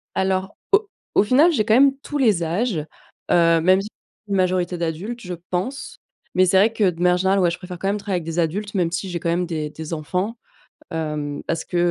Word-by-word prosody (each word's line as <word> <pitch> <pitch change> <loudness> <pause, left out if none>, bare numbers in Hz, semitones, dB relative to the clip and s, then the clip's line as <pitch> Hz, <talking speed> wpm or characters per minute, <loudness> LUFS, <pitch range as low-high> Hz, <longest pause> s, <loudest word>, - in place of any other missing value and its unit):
Alors, 190 +1 0 0.2
au 405 +1 +4 0.3
au - - +6
final, 275 +11 +5
j'ai 220 -10 +1
quand 220 - +3
même 270 +3 +5
tous 295 0 -4
les 210 -10 +3
âges, 185 +4 -1 0.5
heu, 165 -1 +5
même, 185 +3 +4
j'i 205 - -6 0.4
une 200 - -1
majorité 180 -1 +1
d'adultes, 175 +9 -4
je 180 -1 -6 0.2
pense, 255 +10 -4 0.4
mais 185 - +5
c'est 190 +1 +3
vrai 210 +4 +5
que, 210 -4 +3
de 170 0 -10
manière 180 0 +4
générale, 190 +2 +2
ouais, 175 -2 +3
je 170 - -4
préfère 180 -1 -9
quand 195 - -2
même 205 - +1
travailler 200 -3 -2
avec - - -10
des 165 +1 -5
adultes, 200 +6 -2
même 175 -3 +1
si 185 +2 -3
j'ai 175 -1 -3
quand 170 - -2
même 175 +1 +1
des 155 -3 -3
des 160 +1 -7
enfants, 180 +9 -2 0.5
hem, 150 -2 -3
parce 165 -1 -2
que, 180 - -5
185 Hz, 225 wpm, -22 LUFS, 170-210 Hz, 0.5 s, au